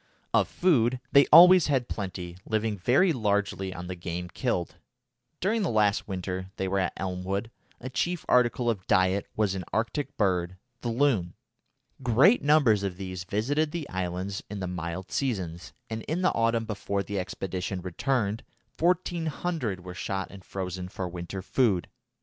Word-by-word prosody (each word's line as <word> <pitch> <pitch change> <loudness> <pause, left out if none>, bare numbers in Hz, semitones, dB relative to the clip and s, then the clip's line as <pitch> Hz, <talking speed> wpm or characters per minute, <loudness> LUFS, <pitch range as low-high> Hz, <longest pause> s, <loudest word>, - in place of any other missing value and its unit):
Of - - +4
food 130 -9 +2
they 140 0 +6
always 180 +1 +9
had 130 -4 +1
plenty, 90 -3 -5
living 110 0 -1
very 130 - +3
largely 100 -5 0
on 90 -1 -7
the 90 - -4
game 90 0 -5
killed. 90 -6 -2 0.6
During 215 +5 +1
the 195 - 0
last 105 -3 +2
winter 95 -1 -4
they 95 - -2
were 95 +1 0
at 95 - 0
Elmwood 95 +4 -3 0.3
a 125 - -7
chief 175 +6 -2
article 125 0 +3
of 105 -5 -1
diet 95 +2 +2
was 105 -3 +1
an 95 -1 -4
Arctic 125 +6 -2
bird, 90 -3 0 0.2
the 120 - -2
loon. 115 -8 +1 0.7
Great 130 - +5
numbers 140 -8 +4
of 95 -3 -3
these 95 -1 -6
visited 140 +11 0
the 160 -2 -5
islands 95 +2 -3
in 105 0 -5
the 95 - -3
mild 90 0 -5
seasons, 95 -10 -2 0.2
and 110 -1 -4
in 170 +5 -1
the 185 - +3
autumn 115 0 +1
before 100 -2 -2
the 100 0 -3
expedition 95 0 -4
returned 105 +4 -1 0.4
1400 165 - -1
were 90 - -6
shot 95 +1 -3
and 100 -2 -12
frozen 90 -1 -5
for 95 0 -4
winter 90 +2 -6
food. 100 - +1
100 Hz, 160 wpm, -27 LUFS, 95-130 Hz, 0.7 s, always